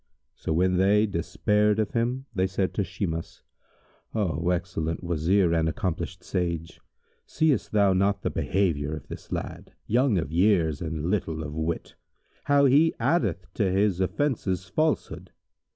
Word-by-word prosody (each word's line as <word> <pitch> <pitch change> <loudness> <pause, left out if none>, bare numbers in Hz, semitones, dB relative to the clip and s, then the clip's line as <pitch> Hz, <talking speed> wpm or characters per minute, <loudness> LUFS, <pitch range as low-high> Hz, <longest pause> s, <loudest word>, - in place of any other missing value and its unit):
So, - - -5
when 90 +3 +2
they 100 +3 +4
despaired 105 +3 +1
of 110 -2 0
him, 125 +3 -1
they 95 0 +1
said 95 0 -1
to 100 - 0
Shimas, 85 -2 -5 0.7
"O 85 -6 0
excellent 85 -2 -2
Wazir 85 +2 +2
and 80 -1 +2
accomplished 90 +2 -3
sage, 85 -3 -3 0.5
seest 155 -4 +1
thou 100 -2 +4
not 100 +1 +1
the - - 0
behaviour 80 -6 0
of 75 - -10
this - - -9
lad, - - -5
young 120 -1 +2
of 80 -3 -2
years 85 -4 +2
and 80 +1 -3
little 80 -6 -1
of 75 -1 -6
wit, 80 +1 -3 0.5
how 145 0 +4
he 145 +5 +4
addeth 125 - +1
to 100 -4 +1
his 95 -1 +2
offences 95 -4 -1
falsehood? 155 - -1
95 Hz, 145 wpm, -26 LUFS, 85-105 Hz, 0.7 s, they